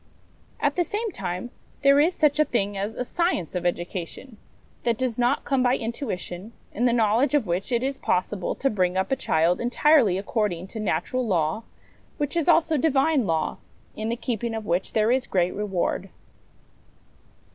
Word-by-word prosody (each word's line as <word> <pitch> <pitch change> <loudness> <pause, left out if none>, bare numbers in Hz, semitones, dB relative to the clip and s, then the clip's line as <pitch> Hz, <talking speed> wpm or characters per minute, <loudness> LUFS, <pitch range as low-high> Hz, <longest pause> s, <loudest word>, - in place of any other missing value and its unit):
At 290 +2 0
the 350 - +3
same 425 +5 -3
time, 180 - -5 0.3
there 280 0 +6
is 330 +5 +3
such 300 -1 +2
a 305 - +5
thing 205 -6 -1
as 200 +3 -3
a 250 - -3
science 340 - -1
of 180 -1 -1
education, 175 +7 -5 0.4
that 235 -2 0
does 250 -2 -2
not 245 +3 +1
come 270 -2 +1
by 250 +1 +3
intuition, 225 -4 -5 0.2
in 240 - 0
the 245 - +4
knowledge 235 +5 +2
of 280 -6 +2
which 180 +5 -2
it 240 0 +1
is 270 0 -2
possible 185 +1 -1
to 270 - 0
bring 185 -3 0
up 190 +4 -1
a - - +4
child 170 -7 +1
entirely 245 - +4
according 200 -3 -1
to 220 - -7
natural 215 +6 -1
law, 170 +2 0 0.5
which 290 +1 -2
is 335 -3 0
also 325 -2 +4
Divine 275 -3 +2
law, 160 -1 0 0.4
in 220 +1 -3
the 235 - 0
keeping 235 -1 -3
of 220 -1 -5
which 180 0 -1
there 220 +1 +3
is 255 0 +1
great 180 -2 +1
reward. 195 -1 -2
230 Hz, 180 wpm, -25 LUFS, 185-270 Hz, 0.5 s, there